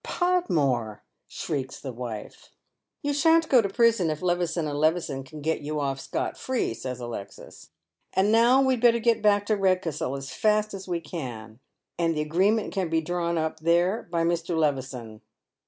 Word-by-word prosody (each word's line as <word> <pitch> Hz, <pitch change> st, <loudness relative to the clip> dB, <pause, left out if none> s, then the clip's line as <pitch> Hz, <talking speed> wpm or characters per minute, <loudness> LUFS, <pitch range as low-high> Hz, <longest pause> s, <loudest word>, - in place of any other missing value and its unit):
" -, -, -53 dB
Podmore! 145 Hz, -, 0 dB
" -, -, -53 dB
shrieks 135 Hz, -5 st, -4 dB
the 130 Hz, -3 st, -6 dB
wife. 120 Hz, -3 st, -7 dB, 0.3 s
" -, -, -56 dB
You 290 Hz, 0 st, 0 dB
shan't 325 Hz, +2 st, +4 dB
go 255 Hz, -3 st, +6 dB
to 200 Hz, -, -2 dB
prison 230 Hz, -5 st, +3 dB
if 155 Hz, +2 st, -4 dB
Levison 175 Hz, -2 st, 0 dB
and 145 Hz, -1 st, -3 dB
Levison 155 Hz, -4 st, 0 dB
can 150 Hz, +3 st, -11 dB
get 160 Hz, +2 st, -1 dB
you 150 Hz, +1 st, -3 dB
off 135 Hz, -1 st, -2 dB
Bcot -, -, -3 dB
free," 260 Hz, -, -1 dB
says 125 Hz, +2 st, -6 dB
Alexis. 120 Hz, -5 st, -9 dB, 0.2 s
" -, -, -51 dB
And 190 Hz, +3 st, +3 dB
now 240 Hz, +4 st, +5 dB
we'd 260 Hz, -3 st, +1 dB
better 235 Hz, -1 st, +5 dB
get 230 Hz, 0 st, +2 dB
bock 205 Hz, -1 st, +3 dB
to 215 Hz, 0 st, +1 dB
Kedcastle 180 Hz, -8 st, 0 dB
as 135 Hz, 0 st, -7 dB
fast 215 Hz, 0 st, +1 dB
as 190 Hz, -1 st, -7 dB
we 175 Hz, -2 st, -2 dB
can, 120 Hz, -9 st, -7 dB, 0.4 s
and 165 Hz, -1 st, +1 dB
the -, -, +1 dB
agreement 190 Hz, +8 st, +1 dB
can 185 Hz, -3 st, -1 dB
be 165 Hz, 0 st, +2 dB
drawn 170 Hz, 0 st, -1 dB
up 160 Hz, 0 st, -2 dB
there 175 Hz, +6 st, +1 dB
by 170 Hz, -1 st, +1 dB
Mr. 170 Hz, 0 st, 0 dB
Levison." 130 Hz, -7 st, -2 dB
170 Hz, 190 wpm, -26 LUFS, 140-210 Hz, 0.4 s, go